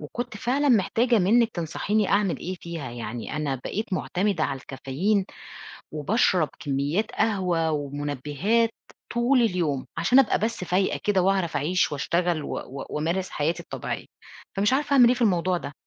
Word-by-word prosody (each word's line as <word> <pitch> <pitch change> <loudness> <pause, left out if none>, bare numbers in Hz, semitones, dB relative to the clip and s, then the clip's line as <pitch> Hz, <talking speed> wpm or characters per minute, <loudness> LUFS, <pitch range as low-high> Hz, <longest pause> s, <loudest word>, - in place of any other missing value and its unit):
وكنت 235 +9 -5
فعلًا 270 +7 +1
محتاجة 235 +1 +3
منِّك 225 +5 +4
تنصحيني 200 +4 -1
أعمل 200 -3 +2
إيه 185 +1 -5
فيها، 165 -7 -6
يعني 120 +2 -5
أنا 150 -3 -1
بقيت 200 - -4
مُعتمدة 185 -2 0
على 135 - -2
الكافيين 160 +11 -1 0.7
وباشرب 165 - +2
كميات 145 +10 -1
قهوة 180 -6 +1
ومنبّهات 145 - 0 0.4
طول 245 +2 +3
اليوم، 170 - 0
عشان 255 - +4
أبقى 270 -5 +4
بس 220 -3 -2
فايقة 185 +2 0
كده 200 -3 +3
وأعرف 190 -4 +1
أعيش 170 +6 +1
وأشتغل 170 +3 0
و - - -6
و 135 +1 -7
وأمارس 170 +5 -1
حياتي 155 +3 -1
الطبيعية، - - -5 0.5
فمش 205 +4 +2
عارفة 285 +2 +1
أعمل 250 -4 +7
إيه 245 - +4
في 250 - -3
الموضوع 185 -4 +2
ده. 140 -3 -7
185 Hz, 150 wpm, -25 LUFS, 150-215 Hz, 0.7 s, أعمل